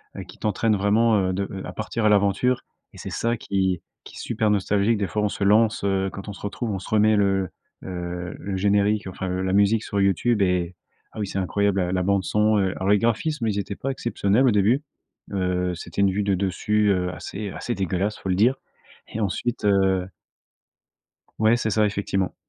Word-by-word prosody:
heu, -, -, -6 dB
qui -, -, -13 dB
t'entraîne 110 Hz, +1 st, +1 dB
vraiment, 105 Hz, +3 st, +3 dB
heu, -, -, -1 dB
de 100 Hz, +1 st, -2 dB, 0.2 s
à -, -, -6 dB
à -, -, -8 dB
partir 115 Hz, -2 st, -3 dB
à -, -, +5 dB
l'aventure 105 Hz, +5 st, +2 dB, 0.3 s
et -, -, -13 dB
c'est -, -, -6 dB
ça 115 Hz, +1 st, -1 dB
qui 95 Hz, -4 st, -1 dB, 0.2 s
qui -, -, -13 dB
est -, -, -9 dB
super 110 Hz, -2 st, 0 dB
nostalgique. 105 Hz, +2 st, +1 dB
Des 100 Hz, -, 0 dB
fois, 105 Hz, +2 st, -2 dB
on 105 Hz, -, +2 dB
se 100 Hz, -, -4 dB
lance, 110 Hz, +2 st, +3 dB
heu, 95 Hz, -1 st, 0 dB
quand 100 Hz, -, -8 dB
on -, -, -5 dB
se -, -, -13 dB
retrouve, 105 Hz, +3 st, -4 dB
on 100 Hz, -, -2 dB
se 95 Hz, -, -9 dB
remet 110 Hz, 0 st, +4 dB
le, 95 Hz, -2 st, +1 dB, 0.3 s
heu, 90 Hz, -1 st, -5 dB
le 100 Hz, -1 st, -4 dB
générique, 100 Hz, +1 st, +2 dB
enfin, 95 Hz, 0 st, -5 dB
heu, 90 Hz, 0 st, -2 dB
la 95 Hz, 0 st, -1 dB
musique 100 Hz, +2 st, +4 dB
sur 100 Hz, -, -2 dB
YouTube 100 Hz, +3 st, +2 dB
et 90 Hz, -1 st, 0 dB, 0.4 s
ah, -, -, -4 dB
oui 105 Hz, -, -2 dB
c'est 95 Hz, -, -3 dB
incroyable, 100 Hz, +1 st, +1 dB
ah, 90 Hz, -1 st, 0 dB
la 90 Hz, -, +1 dB
bande 100 Hz, 0 st, +1 dB
son, 105 Hz, 0 st, +2 dB
heu. 95 Hz, -2 st, +1 dB
Alors 95 Hz, +1 st, -2 dB
les 105 Hz, -, +6 dB
graphismes 115 Hz, +3 st, 0 dB
ils 105 Hz, -2 st, -1 dB
étaient 100 Hz, 0 st, -3 dB
pas 135 Hz, -, -3 dB
exceptionnels 120 Hz, -1 st, +1 dB
au -, -, +5 dB
début. 110 Hz, +7 st, +2 dB, 0.5 s
Heu, 90 Hz, -2 st, 0 dB
c'était 85 Hz, +3 st, -4 dB
une 100 Hz, -1 st, +4 dB
vue 100 Hz, +2 st, -1 dB
de 100 Hz, -1 st, +1 dB
dessus, 105 Hz, +3 st, +1 dB
heu, 90 Hz, -2 st, 0 dB
assez 100 Hz, 0 st, -6 dB
assez 120 Hz, -, -4 dB
dégueulasse 95 Hz, +2 st, -1 dB
faut -, -, -8 dB
le 90 Hz, -, +2 dB
dire 120 Hz, +7 st, +4 dB, 0.5 s
et 110 Hz, -, -5 dB
ensuite, 110 Hz, +4 st, -2 dB
heu 95 Hz, -2 st, +2 dB, 1.3 s
Ouais, 110 Hz, +2 st, +4 dB
c'est 115 Hz, -2 st, -1 dB
ça 105 Hz, 0 st, +2 dB
effectivement. 100 Hz, -2 st, -1 dB
100 Hz, 215 wpm, -24 LUFS, 95-110 Hz, 1.3 s, les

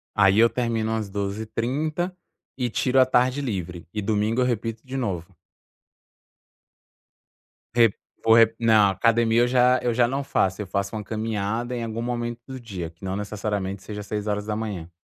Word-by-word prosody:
Aí 100 Hz, 0 st, +5 dB
eu 115 Hz, +1 st, +6 dB
termino 115 Hz, -3 st, -1 dB
às 110 Hz, -3 st, -2 dB
12h30 115 Hz, -, -2 dB, 0.4 s
e 125 Hz, -2 st, 0 dB
tiro 130 Hz, +3 st, +2 dB
à 130 Hz, -, +7 dB
tarde 130 Hz, +2 st, +2 dB
livre 90 Hz, -, -4 dB
e 105 Hz, -, -2 dB
domingo 110 Hz, +4 st, +1 dB
eu -, -, +3 dB
repito 115 Hz, -1 st, -2 dB
de 130 Hz, +1 st, -5 dB
novo. 95 Hz, -10 st, -2 dB, 2.5 s
Rep 115 Hz, -4 st, +5 dB, 0.3 s
vo 110 Hz, -, +6 dB
rep 115 Hz, -1 st, +5 dB
não 110 Hz, -3 st, +5 dB
academia 115 Hz, +3 st, +3 dB
eu 120 Hz, -, +4 dB
já 125 Hz, 0 st, +4 dB
eu 120 Hz, -, 0 dB
já 120 Hz, 0 st, +3 dB
não 135 Hz, +3 st, -2 dB
faço, 95 Hz, -7 st, 0 dB
eu 100 Hz, -, -5 dB
faço 100 Hz, +2 st, -2 dB
uma 105 Hz, -, -4 dB
caminhada 110 Hz, +2 st, -2 dB
em 120 Hz, -, -3 dB
algum 115 Hz, 0 st, -4 dB
momento 120 Hz, -1 st, -3 dB
do 130 Hz, -1 st, -7 dB
dia 95 Hz, -8 st, -6 dB
que 85 Hz, +3 st, -13 dB
não 95 Hz, 0 st, -2 dB
necessariamente 100 Hz, -2 st, -3 dB
seja 105 Hz, -1 st, -6 dB
6h. 105 Hz, -3 st, -3 dB
110 Hz, 165 wpm, -24 LUFS, 100-120 Hz, 2.5 s, à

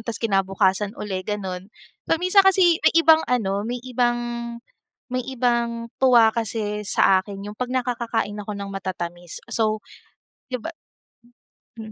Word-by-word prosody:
tapos 225 Hz, 0 st, -6 dB
kinabukasan 195 Hz, 0 st, +1 dB
uli, 195 Hz, -3 st, -4 dB
gano'n. 190 Hz, -3 st, -4 dB, 0.4 s
Paminsan 365 Hz, +4 st, +4 dB
kasi 350 Hz, -3 st, +4 dB
may -, -, +4 dB
ibang 320 Hz, -1 st, +6 dB
ano 200 Hz, -5 st, 0 dB
may 245 Hz, -, -2 dB
ibang, 245 Hz, -1 st, +1 dB, 0.9 s
may 255 Hz, -, 0 dB
ibang 235 Hz, -2 st, -1 dB
tuwa 240 Hz, -4 st, +6 dB
kasi 215 Hz, -2 st, -2 dB
sa 190 Hz, -1 st, +4 dB
akin 195 Hz, 0 st, -8 dB
yung 210 Hz, -, -8 dB
'pag 250 Hz, -, -2 dB
nakakakain 235 Hz, -4 st, -1 dB
ako 210 Hz, +1 st, -6 dB
ng 200 Hz, 0 st, -6 dB
matatamis. 175 Hz, -2 st, -6 dB
So, 215 Hz, -1 st, 0 dB, 0.7 s
di -, -, +1 dB
ba -, -, -4 dB, 1.1 s
mm, 220 Hz, 0 st, -9 dB
220 Hz, 135 wpm, -23 LUFS, 195-245 Hz, 1.1 s, ibang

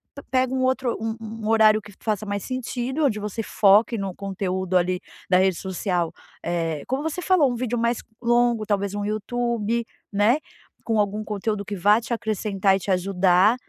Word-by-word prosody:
pe 280 Hz, -, -9 dB
pega 255 Hz, -1 st, +2 dB
um 260 Hz, 0 st, 0 dB
outro 260 Hz, -2 st, 0 dB
um 225 Hz, 0 st, -2 dB
um 220 Hz, 0 st, -7 dB
um -, -, -1 dB
horário 220 Hz, -1 st, +5 dB
que 205 Hz, -1 st, -13 dB
faça 215 Hz, -2 st, -1 dB
mais 200 Hz, -1 st, -3 dB
sentido 255 Hz, +3 st, -2 dB
onde 215 Hz, -6 st, +1 dB
você 210 Hz, +2 st, -4 dB
foque 210 Hz, +4 st, +4 dB
no 195 Hz, -3 st, -4 dB
conteúdo 190 Hz, -1 st, -3 dB
ali 180 Hz, 0 st, +2 dB, 0.3 s
da 180 Hz, -, +5 dB
rede 190 Hz, -1 st, +3 dB
social, 180 Hz, -3 st, -2 dB, 0.3 s
eh, 165 Hz, -3 st, -1 dB
como 265 Hz, +4 st, -1 dB
você 320 Hz, +3 st, -3 dB
falou, 325 Hz, -10 st, +3 dB
um -, -, -3 dB
vídeo 240 Hz, 0 st, -2 dB
mais 235 Hz, 0 st, +1 dB, 0.2 s
longo 240 Hz, -2 st, +2 dB
talvez 200 Hz, -1 st, -1 dB
um 205 Hz, -, -2 dB
YouTube, 230 Hz, +1 st, -1 dB, 0.3 s
né, 210 Hz, +6 st, +3 dB, 0.5 s
com 225 Hz, -2 st, 0 dB
algum 210 Hz, +1 st, 0 dB
conteúdo 210 Hz, 0 st, -2 dB
que 205 Hz, +1 st, -5 dB
vá 205 Hz, +5 st, +4 dB
te 235 Hz, -, -9 dB
acrescentar 210 Hz, -4 st, +1 dB
e 195 Hz, -, -1 dB
te 200 Hz, -, -7 dB
ajudar, 185 Hz, +2 st, +3 dB
215 Hz, 190 wpm, -24 LUFS, 195-235 Hz, 0.5 s, horário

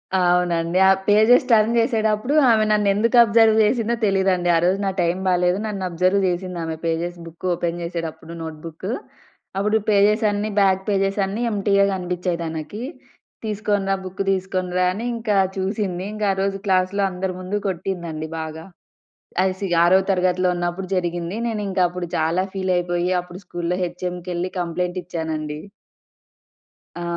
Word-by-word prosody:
అవునండి. 175 Hz, -1 st, +2 dB
ఆ -, -, +7 dB, 0.2 s
pages 220 Hz, +5 st, +5 dB
turn 220 Hz, 0 st, +4 dB
జేసేటప్పుడు, 225 Hz, +1 st, +1 dB, 0.2 s
ఆమె 220 Hz, -1 st, +4 dB
నన్నేందుకు 210 Hz, +3 st, +2 dB
అబ్జర్వ్ 225 Hz, 0 st, +4 dB
చేసిందో 235 Hz, +1 st, +1 dB
తెలీదండి. 190 Hz, -3 st, +1 dB
ఆ -, -, +3 dB
రోజు 185 Hz, +2 st, +2 dB
నా 195 Hz, -, +1 dB
టైం 175 Hz, +1 st, +1 dB
బాలేదు. 180 Hz, 0 st, +2 dB
నన్ను 200 Hz, -3 st, -4 dB
అబ్జర్వ్ 185 Hz, +3 st, +2 dB
చేసింది 180 Hz, 0 st, -3 dB
ఆమె, 160 Hz, 0 st, -3 dB
పేజెస్ 170 Hz, +2 st, -2 dB
బుక్కు 165 Hz, +3 st, -7 dB
ఓపెన్ 170 Hz, 0 st, -2 dB
చేసేటప్పుడు 165 Hz, -1 st, -5 dB
నోట్‌బుక్కు. 160 Hz, +4 st, -6 dB, 0.7 s
అప్పుడు 210 Hz, +2 st, +2 dB
పేజెసన్నీ 210 Hz, +1 st, +2 dB
బ్యాక్ 190 Hz, -1 st, +3 dB
పేజెసన్నీ 195 Hz, +1 st, 0 dB
ఎంప్టీగా 200 Hz, -1 st, +2 dB
గపిచ్చాయి 180 Hz, -1 st, -2 dB
తనకి. 160 Hz, +6 st, -5 dB, 0.6 s
తీసుకొనిరా 205 Hz, -2 st, 0 dB
బుక్ 185 Hz, +1 st, -5 dB
తీసుకొనిరా 185 Hz, -1 st, -1 dB
అని, 220 Hz, +5 st, -5 dB
ఇంకా 220 Hz, -3 st, -1 dB, 0.2 s
చూసింది. 190 Hz, -2 st, -2 dB
ఇంకా 215 Hz, -1 st, -1 dB
ఆరోజు 195 Hz, +1 st, -1 dB
క్లాస్‌లో 190 Hz, +1 st, +2 dB
అందరి 185 Hz, +1 st, -3 dB
ముందు 185 Hz, +3 st, -2 dB
కొట్టిందండి 170 Hz, -4 st, -4 dB
బాగా. 160 Hz, 0 st, -6 dB, 0.8 s
అసి 190 Hz, +1 st, -1 dB, 0.2 s
ఆరో 185 Hz, +2 st, +6 dB
తరగతిలో 185 Hz, -1 st, +2 dB
ఉన్నప్పుడు 175 Hz, +2 st, -3 dB
జరిగింది. 175 Hz, +1 st, -2 dB
నేనింకప్పుడు 185 Hz, -5 st, -1 dB
చాలా 165 Hz, +4 st, +1 dB
ఫీలైపోయి, 180 Hz, -2 st, 0 dB
అప్పుడు 180 Hz, +2 st, -11 dB
స్కూల్‌లో 175 Hz, +1 st, -3 dB
హెచ్ఎంకెళ్లి 180 Hz, 0 st, -4 dB
కంప్లెయింట్ 180 Hz, +1 st, -2 dB
ఇచ్చానండి. 155 Hz, -3 st, -4 dB, 1.4 s
ఆ! 175 Hz, -, -5 dB
185 Hz, 130 wpm, -22 LUFS, 175-200 Hz, 1.4 s, ఆ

